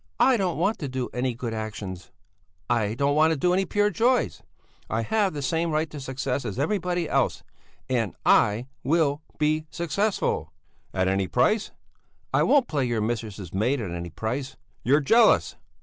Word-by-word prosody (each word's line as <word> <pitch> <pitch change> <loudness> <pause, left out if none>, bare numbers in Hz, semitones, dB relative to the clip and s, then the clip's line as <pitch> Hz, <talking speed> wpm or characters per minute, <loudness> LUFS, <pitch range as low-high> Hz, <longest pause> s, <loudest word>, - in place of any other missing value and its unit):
"I 265 - +5
don't 190 -6 0
want 195 +7 +1
to 145 - -3
do 130 -1 -3
any 125 0 -1
good 120 -1 -4
actions! 105 -4 -6 0.6
I 110 -3 +1
don't 140 +3 +1
want 155 -1 +3
any 180 +2 +3
pure 205 +3 +1
joys! 245 +7 +1 0.5
I 115 +1 0
have 205 - +1
the 145 - -3
same 165 +4 0
right 155 +1 0
to 150 - -7
success 135 0 -3
as 110 -2 -5
everybody 175 +2 0
else! - - 0 0.4
And 115 - -1
I 105 +4 +4 0.2
will 150 -1 +2 0.2
be 155 0 +1
successful!" 170 - -1 0.4
"At 95 -1 0
any 95 0 +1
price?" 210 - +2 0.6
"I - - +4
won't 275 -4 +4
play 145 -4 0
your 120 -2 -1
mistress's 105 -5 -4
maid 120 +8 +1
at 100 -6 -4
any 85 0 -5
price." 125 - -4 0.3
"You're 140 +5 +4
jealous! 225 +10 +4
140 Hz, 165 wpm, -25 LUFS, 110-170 Hz, 0.6 s, I